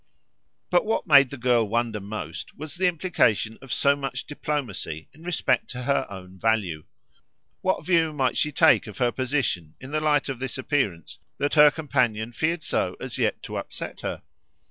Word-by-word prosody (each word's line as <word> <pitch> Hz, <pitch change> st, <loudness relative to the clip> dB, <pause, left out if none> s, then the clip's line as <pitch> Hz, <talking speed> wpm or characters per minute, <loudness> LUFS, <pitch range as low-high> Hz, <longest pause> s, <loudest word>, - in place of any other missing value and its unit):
But 175 Hz, -, +4 dB
what 220 Hz, +1 st, -1 dB
made 140 Hz, -5 st, +7 dB
the 140 Hz, -, -7 dB
girl 120 Hz, -3 st, +2 dB
wonder 115 Hz, -1 st, 0 dB
most 100 Hz, -6 st, -7 dB
was 155 Hz, 0 st, -7 dB
the 180 Hz, +2 st, +1 dB
implication 155 Hz, -, +1 dB
of 135 Hz, -, -10 dB
so 140 Hz, 0 st, +3 dB
much 140 Hz, -1 st, -4 dB
diplomacy 125 Hz, -, -4 dB
in 155 Hz, -, -18 dB
respect 165 Hz, -7 st, 0 dB
to 125 Hz, 0 st, -5 dB
her 140 Hz, +1 st, +1 dB
own 95 Hz, -1 st, -10 dB
value. 100 Hz, -8 st, 0 dB, 0.8 s
What 185 Hz, 0 st, 0 dB
view 165 Hz, -3 st, +3 dB
might 135 Hz, -4 st, 0 dB
she 150 Hz, -, +1 dB
take 155 Hz, -3 st, +4 dB
of 105 Hz, -2 st, -9 dB
her 120 Hz, -1 st, +2 dB
position 125 Hz, -, -1 dB
in 130 Hz, +2 st, -10 dB
the 155 Hz, 0 st, 0 dB
light 150 Hz, -2 st, +2 dB
of 135 Hz, -3 st, -4 dB
this 130 Hz, 0 st, -4 dB
appearance 125 Hz, -, -2 dB, 0.2 s
that 145 Hz, -, 0 dB
her 150 Hz, -1 st, +8 dB
companion 125 Hz, -8 st, 0 dB
feared 160 Hz, +6 st, -1 dB
so -, -, 0 dB
as -, -, -5 dB
yet -, -, 0 dB
to -, -, -5 dB
upset -, -, -6 dB
her? -, -, -4 dB
130 Hz, 180 wpm, -25 LUFS, 110-150 Hz, 0.8 s, her